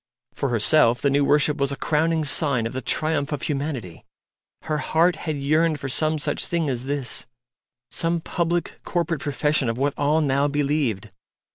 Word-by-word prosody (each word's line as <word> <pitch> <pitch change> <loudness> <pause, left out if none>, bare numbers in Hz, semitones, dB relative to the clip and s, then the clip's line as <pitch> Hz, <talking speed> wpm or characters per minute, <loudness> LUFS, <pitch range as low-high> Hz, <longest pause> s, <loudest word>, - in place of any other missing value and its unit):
For 140 - -2
herself 120 +1 +4
the 140 - +1
new 140 +1 +3
worship 150 +1 +2
was 140 0 0
a - - -2
crowning 160 +2 0
sign 140 -5 0
of 115 - -4
the 130 - -3
triumph 155 -1 0
of 145 -4 -3
Humanity. 135 - -4 0.6
Her 155 -1 -2
heart 165 +3 +2
had 155 -1 -4
yearned 155 +2 +1
for 135 - -5
some 155 +4 0
such 150 - -1
thing 165 -4 -1
as 125 0 -4
this 140 -2 -1 0.6
some 170 0 0
public 170 0 -2
corporate 170 -4 -2
profession 145 -2 0
of 115 - -2
what 140 +2 0
all 145 +2 +2
now 140 -1 +2
believed. 140 -8 -1
145 Hz, 170 wpm, -23 LUFS, 135-155 Hz, 0.6 s, herself